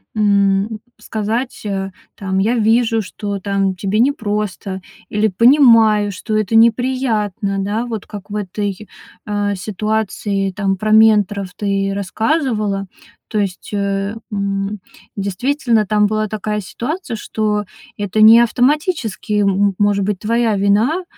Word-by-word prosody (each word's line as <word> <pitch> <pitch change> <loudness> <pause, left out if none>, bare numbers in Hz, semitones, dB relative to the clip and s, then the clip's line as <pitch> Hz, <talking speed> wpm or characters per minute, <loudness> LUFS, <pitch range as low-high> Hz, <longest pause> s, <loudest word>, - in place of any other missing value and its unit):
м, 200 0 +2 0.2
сказать, 220 +3 -3
э, 195 -1 -3 0.2
там: 190 -1 -3
"Я 220 +5 +1
вижу, 225 0 +2
что, 200 +1 -5
там, 195 -1 -1
тебе 195 +3 -1
непросто, 210 -7 -1 0.3
или 210 +1 +1
понимаю, 225 -2 +5
что 215 +3 -3
это 215 +1 0
неприятно". 225 -4 +1
Да? 210 +4 -2
Вот 225 -4 -5
как 205 -1 -9
в 205 - -6
этой, 205 0 -4 0.4
а, 205 -1 -1
ситуации, 205 0 -2
там, 195 0 -1
про 215 +3 -2
менторов 210 -3 +4
ты 195 -1 -1
рассказывала. 210 - -1 0.4
То 215 - -2
есть, 195 -3 -4
э, 200 0 -1 0.2
м, 200 0 -2 0.4
действительно, 220 +3 0
там 210 +1 +3
была 215 +1 0
такая 210 0 -3
ситуация, 240 - -5
что 210 -1 -2 0.3
это 205 +1 -1
не 220 +2 +9
автоматически, 245 - +1
м 200 - +3 0.2
м 195 - -7
может 205 -1 +2
быть, 200 -2 -2
твоя 230 +1 +1
вина. 210 - +2
210 Hz, 130 wpm, -18 LUFS, 200-225 Hz, 0.4 s, не